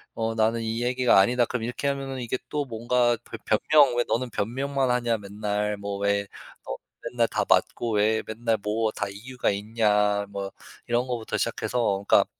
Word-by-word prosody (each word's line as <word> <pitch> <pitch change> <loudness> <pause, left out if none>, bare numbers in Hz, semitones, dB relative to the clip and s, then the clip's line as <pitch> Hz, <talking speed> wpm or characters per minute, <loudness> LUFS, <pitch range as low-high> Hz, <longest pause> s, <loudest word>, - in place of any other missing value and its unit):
어 115 0 -1
"나는 115 +1 +2
이 115 +1 -2
얘기가 125 -3 +4
아니다." 120 +4 +4
그럼 125 -1 -3
이렇게 125 +4 -3
하면은 135 -1 -3
이게 120 +1 -2
또 150 -1 -1
뭔가 120 0 +1
벼 115 - -8 0.3
변명. 145 -5 +6
"왜 120 - +3
너는 125 +1 0
변명만 135 +4 -1
하냐? 120 -2 +1
맨날 105 0 -2
뭐 100 0 -4
왜 100 0 +1 0.4
어 - - -4 0.4
맨날 120 -1 +2
다 - - 0
맞고 115 -2 +2
왜 110 +1 +2
맨날 115 0 0
뭐 110 +1 0
다 100 - -3
이유가 120 +5 -2
있냐?" 105 -1 +1
뭐 100 -1 -5 0.4
이런 120 +1 +1
거부터 120 -3 -3
시작해서 105 -5 0
그니까 - - +6
115 Hz, 325 characters per minute, -26 LUFS, 105-125 Hz, 0.4 s, 변명